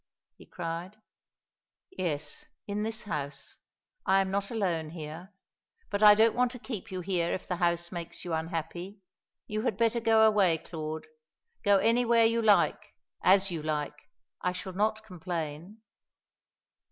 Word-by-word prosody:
he - - -16
cried. 175 +3 -5 0.9
"Yes, 150 - -3 0.2
in 205 +1 -3
this 220 +1 -2
house. 145 -8 -5 0.5
I 195 - +4
am 190 -1 0
not 200 0 -1
alone 175 -9 -1
here. 160 +3 -8 0.6
But 200 - -1
I 210 -1 +9
don't 225 +1 +5
want 250 0 +2
to - - -7
keep 225 -4 -6
you 185 -1 -3
here 175 -2 0
if - - -4
the 180 - -2
house 170 0 0
makes 170 -1 -6
you 175 - -3
unhappy. 165 +4 -4 0.5
You 215 0 -2
had 220 -5 -1
better 230 +1 +2
go 225 -1 +5
away, 200 -6 +4
Claude; 155 -1 -6 0.6
go 200 0 +5
anywhere 230 +1 +4
you 230 +1 +2
like, 210 -2 +3 0.3
as 190 +1 +4
you 165 -3 -3
like. 150 -1 -3 0.3
I 180 - 0
shall 185 +1 -6
not 215 +3 0
complain." 175 +1 -6
190 Hz, 150 wpm, -29 LUFS, 165-215 Hz, 0.9 s, I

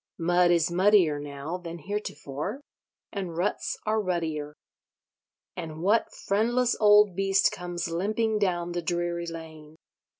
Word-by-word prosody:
Mud 175 +1 +3
is 170 0 +3
muddier 180 -4 +4
now 145 +4 -5
than 170 -1 -7
heretofore; 170 - -5 0.5
and 185 -5 -4
ruts 185 +4 -1
are 215 0 +1
ruttier. 160 -6 -2 1.0
And 160 0 -6
what 215 +4 +2
friendless 235 +5 +1
old 210 -3 +6
beast 195 0 +3
comes 175 -4 -4
limping 215 +6 0
down 175 -3 0
the 175 0 -2
dreary 170 0 -2
lane? 160 -2 -9
175 Hz, 125 wpm, -27 LUFS, 165-205 Hz, 1.0 s, old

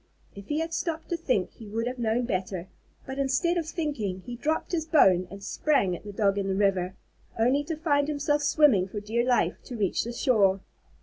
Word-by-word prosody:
If 200 0 -11
he 295 - -1
had 325 0 -4
stopped 325 -1 -3
to 345 - 0
think 255 - 0
he 225 - -12
would 225 +3 -2
have 250 +1 -4
known 235 +1 +1
better. 190 -4 -3 0.4
But 265 +1 -6
instead 275 +6 +1
of 335 -3 -1
thinking, 280 - -3
he 245 +5 -7
dropped 310 +6 -1
his 325 -3 -1
bone 185 - +4
and 200 0 -10
sprang 200 -8 +1
at - - -11
the 210 - -7
Dog 200 -1 +1
in 195 - -2
the 190 - 0
river, 190 -2 +1 0.4
only 255 +6 +3
to 325 - -3
find 290 -3 +1
himself 295 0 0
swimming 285 - +4
for 205 +2 -5
dear 220 +3 -1
life 250 -1 +1
to 245 - -7
reach 200 -4 0
the 235 - -5
shore. 210 -7 +2
240 Hz, 210 wpm, -27 LUFS, 200-295 Hz, 0.4 s, bone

